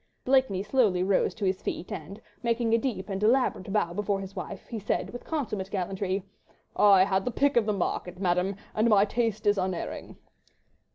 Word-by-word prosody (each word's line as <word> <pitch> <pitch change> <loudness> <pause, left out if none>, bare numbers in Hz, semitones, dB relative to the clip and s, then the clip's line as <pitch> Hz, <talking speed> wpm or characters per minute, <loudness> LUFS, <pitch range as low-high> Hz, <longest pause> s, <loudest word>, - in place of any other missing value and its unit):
Blakeney 255 -8 +2
slowly 205 -6 +2
rose 190 0 +1
to 210 - -3
his 185 0 0
feet, 180 - -4
and, 185 +7 -7 0.2
making 235 -1 +1
a - - +6
deep 220 -6 -3
and 195 -1 -4
elaborate 220 -4 +2
bow 185 -5 +1
before 200 +1 -1
his 195 0 -8
wife, 195 - -6
he 230 - -5
said 205 - -2
with 245 - -8
consummate 215 -11 -3
gallantry,— 190 0 -2 0.5
"I 195 -2 +6
had 190 0 +1
the - - -1
pick 280 +4 +1
of 230 -3 +3
the 210 - +2
market, 180 -1 -2
Madame, 180 +1 +1 0.2
and 220 +2 +2
my 205 -2 +5
taste 220 -1 -1
is 205 -1 +3
unerring." 185 -2 -4
200 Hz, 185 wpm, -28 LUFS, 190-230 Hz, 0.5 s, a